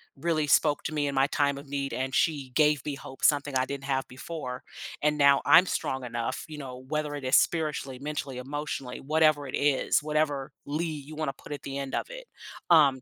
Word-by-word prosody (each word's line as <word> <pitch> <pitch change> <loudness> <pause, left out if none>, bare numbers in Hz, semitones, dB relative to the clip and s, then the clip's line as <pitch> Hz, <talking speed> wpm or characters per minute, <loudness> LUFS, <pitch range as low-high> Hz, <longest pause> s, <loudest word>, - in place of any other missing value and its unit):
really 155 +1 0
spoke 145 0 +3
to - - -3
me 145 -1 0
in 140 - -2
my 135 +1 +4
time 140 -1 +1
of 140 0 -10
need, 140 0 -3
and 130 0 -2
she 145 -5 +1
gave 150 0 +3
me 145 -2 -2
hope, 135 -1 -11
something 145 -1 +3
I 130 0 +3
didn't 140 0 -6
have 135 -1 -1
before, 130 -1 -6 0.4
and 150 0 +2
now 140 -1 +5
I'm 180 - +8
strong 130 -7 -2
enough," 120 +1 -3
you 155 -1 -8
know, 130 -3 -7
whether 150 0 -2
it 145 - -6
is 130 +2 +3
spiritually, 150 -5 0
mentally, 145 -2 -4
emotionally, 135 -1 -5
whatever 155 0 +2
it 130 - -4
is, 140 0 +2
whatever 150 -3 0
"ly" 150 +4 -2
you 155 -1 -6
wanna 155 -3 -2
put 145 - -14
at 145 - -5
the 135 0 -5
end 135 -1 -5
of - - -2
it, - - -9 0.4
um, 145 -6 +6
145 Hz, 210 wpm, -28 LUFS, 135-150 Hz, 0.4 s, I'm